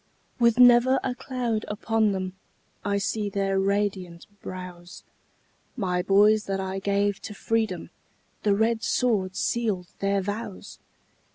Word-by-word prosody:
With 235 Hz, -1 st, +4 dB
never 250 Hz, +1 st, +6 dB
a 260 Hz, -, -1 dB
cloud 245 Hz, -4 st, -3 dB
upon 220 Hz, 0 st, +1 dB
them, 185 Hz, -1 st, -3 dB, 0.5 s
I 200 Hz, 0 st, 0 dB
see 205 Hz, +1 st, -1 dB
their 195 Hz, -1 st, 0 dB
radiant 195 Hz, -3 st, -1 dB, 0.2 s
brows; 180 Hz, -1 st, -9 dB, 0.7 s
My 180 Hz, -5 st, 0 dB
boys 205 Hz, +3 st, +4 dB
that 195 Hz, 0 st, -2 dB
I 190 Hz, 0 st, -3 dB
gave 200 Hz, 0 st, 0 dB
to 210 Hz, -, -7 dB
freedom, 220 Hz, -5 st, -1 dB, 0.5 s
The 205 Hz, -2 st, +2 dB
red 220 Hz, +2 st, +1 dB
sword 205 Hz, -9 st, 0 dB
sealed 210 Hz, -7 st, -1 dB
their 200 Hz, 0 st, +1 dB
vows! 205 Hz, 0 st, -6 dB
200 Hz, 125 wpm, -26 LUFS, 190-225 Hz, 0.7 s, never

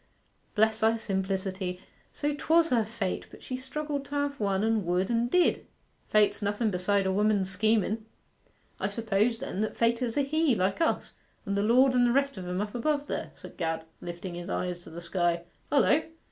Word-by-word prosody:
Bless 220 Hz, 0 st, +3 dB
thy 225 Hz, +1 st, +3 dB
simplicity, 190 Hz, -3 st, -2 dB, 0.3 s
so 295 Hz, 0 st, -1 dB
'twas 330 Hz, +3 st, +3 dB
her 235 Hz, -3 st, +4 dB
fate; 210 Hz, -3 st, -3 dB
but -, -, -14 dB
she 255 Hz, -, -4 dB
struggled 285 Hz, +2 st, -4 dB
to 285 Hz, -, -6 dB
have 285 Hz, 0 st, -1 dB
one, 200 Hz, -1 st, +1 dB
and 220 Hz, -2 st, +2 dB
would, 180 Hz, +4 st, 0 dB
and 235 Hz, +1 st, +1 dB
did. 360 Hz, +5 st, +2 dB, 0.4 s
Fate's 210 Hz, 0 st, +3 dB
nothen 205 Hz, +2 st, 0 dB
beside 195 Hz, +2 st, +1 dB
a 190 Hz, -, +2 dB
woman's 205 Hz, -1 st, +2 dB
schemen!' 215 Hz, +2 st, +1 dB, 0.7 s
'I -, -, 0 dB
suppose, 225 Hz, +1 st, +1 dB
then, 225 Hz, -6 st, -4 dB
that 215 Hz, -, -2 dB
Fate 230 Hz, +1 st, +2 dB
is 240 Hz, 0 st, -1 dB
a -, -, +4 dB
He, 305 Hz, -1 st, +2 dB
like 195 Hz, -, 0 dB
us, 325 Hz, -, 0 dB, 0.3 s
and 200 Hz, -, -1 dB
the 200 Hz, -, +1 dB
Lord, 255 Hz, +5 st, +5 dB
and 245 Hz, -1 st, +4 dB
the -, -, +3 dB
rest 275 Hz, +1 st, +2 dB
o' -, -, -5 dB
'em 180 Hz, +1 st, -2 dB
up 210 Hz, 0 st, -4 dB
above 285 Hz, +4 st, 0 dB
there,' -, -, -4 dB
said -, -, -12 dB
Gad, 165 Hz, -2 st, -2 dB, 0.2 s
lifting 175 Hz, +1 st, -6 dB
his 175 Hz, +2 st, -6 dB
eyes 180 Hz, -2 st, -2 dB
to 175 Hz, -, -13 dB
the 170 Hz, +2 st, -8 dB
sky. 175 Hz, -1 st, 0 dB, 0.3 s
'Hullo! 290 Hz, +2 st, +4 dB
215 Hz, 195 wpm, -28 LUFS, 190-255 Hz, 0.7 s, Lord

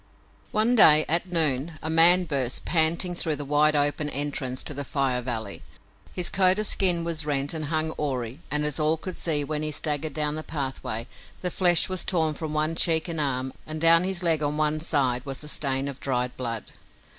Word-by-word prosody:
One 220 Hz, +3 st, +2 dB
day, 155 Hz, -8 st, +8 dB
at 175 Hz, +3 st, 0 dB
noon, 155 Hz, -1 st, +1 dB
a -, -, -3 dB
man 170 Hz, +3 st, +6 dB
burst, 135 Hz, -6 st, -4 dB
panting, 170 Hz, +2 st, +1 dB
through 165 Hz, -3 st, -1 dB
the 145 Hz, 0 st, -6 dB
wide 150 Hz, +2 st, +3 dB
open 145 Hz, +1 st, 0 dB
entrance 140 Hz, -3 st, -3 dB
to -, -, -5 dB
the 140 Hz, +1 st, -5 dB
Fire 135 Hz, -2 st, -1 dB
Valley. 110 Hz, -5 st, -5 dB, 0.5 s
His 180 Hz, -1 st, -3 dB
coat 190 Hz, 0 st, +3 dB
of 215 Hz, -, -1 dB
skin 180 Hz, -4 st, +1 dB
was 165 Hz, -2 st, -2 dB
rent 145 Hz, -1 st, -2 dB
and 155 Hz, -2 st, -3 dB
hung 155 Hz, +1 st, -1 dB
awry 130 Hz, -3 st, -4 dB
and, 150 Hz, 0 st, 0 dB
as 150 Hz, 0 st, -2 dB
all 155 Hz, +1 st, +1 dB
could 185 Hz, +3 st, -8 dB
see 150 Hz, -3 st, 0 dB
when 150 Hz, +1 st, -3 dB
he 155 Hz, 0 st, -2 dB
staggered 150 Hz, 0 st, -1 dB
down 150 Hz, 0 st, -1 dB
the 155 Hz, -, -3 dB
pathway, 135 Hz, -7 st, -4 dB, 0.4 s
the 180 Hz, -, -2 dB
flesh 175 Hz, -2 st, +4 dB
was 185 Hz, -1 st, -2 dB
torn 160 Hz, -4 st, 0 dB
from 155 Hz, +1 st, -6 dB
one 155 Hz, +1 st, 0 dB
cheek 165 Hz, 0 st, +3 dB
and 165 Hz, -3 st, -2 dB
arm, 130 Hz, -2 st, -1 dB
and 155 Hz, 0 st, -6 dB
down 165 Hz, +1 st, +5 dB
his 185 Hz, -1 st, 0 dB
leg 165 Hz, -3 st, +1 dB
on 150 Hz, 0 st, -2 dB
one 155 Hz, 0 st, 0 dB
side 135 Hz, -6 st, 0 dB
was 135 Hz, -2 st, -6 dB
the 150 Hz, -, -9 dB
stain 135 Hz, -2 st, -1 dB
of 140 Hz, -2 st, -7 dB
dried 125 Hz, -2 st, -3 dB
blood. 115 Hz, -4 st, -6 dB
150 Hz, 205 wpm, -25 LUFS, 140-165 Hz, 0.5 s, day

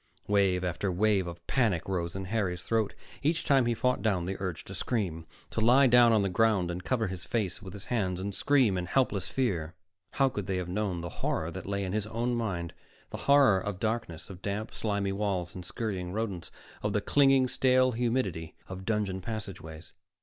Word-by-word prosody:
Wave 95 Hz, -3 st, +2 dB
after 90 Hz, +2 st, -1 dB
wave 100 Hz, 0 st, +2 dB
of 85 Hz, 0 st, -9 dB
panic 105 Hz, -11 st, +1 dB
rose 90 Hz, -3 st, -2 dB
in 95 Hz, 0 st, -4 dB
Harry's 95 Hz, -4 st, -1 dB
throat. 110 Hz, -3 st, 0 dB, 0.3 s
Each 160 Hz, +3 st, +1 dB
time 135 Hz, -4 st, +4 dB
he 120 Hz, -, +1 dB
fought 125 Hz, +2 st, +1 dB
down 95 Hz, -6 st, +1 dB
the 95 Hz, +2 st, -3 dB
urge 95 Hz, -4 st, -4 dB
to -, -, -9 dB
scream, 90 Hz, -9 st, -2 dB, 0.2 s
to 115 Hz, -, -1 dB
lie 125 Hz, +5 st, +6 dB
down 120 Hz, -1 st, +6 dB
on 110 Hz, -3 st, +4 dB
the -, -, +1 dB
ground 95 Hz, -2 st, +2 dB
and 90 Hz, +1 st, -5 dB
cover 120 Hz, 0 st, 0 dB
his 95 Hz, -2 st, -5 dB
face 105 Hz, -7 st, -2 dB
with 95 Hz, -2 st, -9 dB
his 100 Hz, -, -9 dB
hands 95 Hz, -7 st, -1 dB
and 100 Hz, +2 st, -3 dB
scream 125 Hz, -7 st, +3 dB
in 90 Hz, -, -4 dB
helpless 105 Hz, -4 st, +1 dB
fear. 90 Hz, -11 st, -1 dB, 0.4 s
How 135 Hz, -, +3 dB
could 105 Hz, -7 st, -4 dB
they 95 Hz, -1 st, 0 dB
have 90 Hz, -1 st, -3 dB
known 95 Hz, -2 st, -2 dB
the 85 Hz, -, -5 dB
horror 80 Hz, +2 st, -1 dB
that -, -, -7 dB
lay 100 Hz, 0 st, -1 dB
in 95 Hz, 0 st, -3 dB
his 105 Hz, 0 st, -1 dB
own 115 Hz, +3 st, -1 dB
mind, 95 Hz, -8 st, -2 dB, 0.4 s
the -, -, -4 dB
horror 140 Hz, -9 st, +6 dB
of 100 Hz, -1 st, -4 dB
darkness, 110 Hz, -7 st, -2 dB
of 95 Hz, -2 st, -10 dB
damp 105 Hz, +2 st, -3 dB
slimy 100 Hz, -2 st, -1 dB
walls 95 Hz, -3 st, -2 dB
and 90 Hz, -, -7 dB
scurrying 95 Hz, -3 st, -4 dB
rodents, 105 Hz, -5 st, -3 dB, 0.3 s
of 105 Hz, -1 st, -1 dB
the 105 Hz, -, +1 dB
clinging, 135 Hz, +1 st, +4 dB
stale 130 Hz, 0 st, +3 dB
humidity 115 Hz, -9 st, -1 dB
of 95 Hz, 0 st, -7 dB
dungeon 100 Hz, -3 st, -1 dB
passageways? 90 Hz, -7 st, -7 dB
100 Hz, 200 wpm, -29 LUFS, 90-115 Hz, 0.4 s, lie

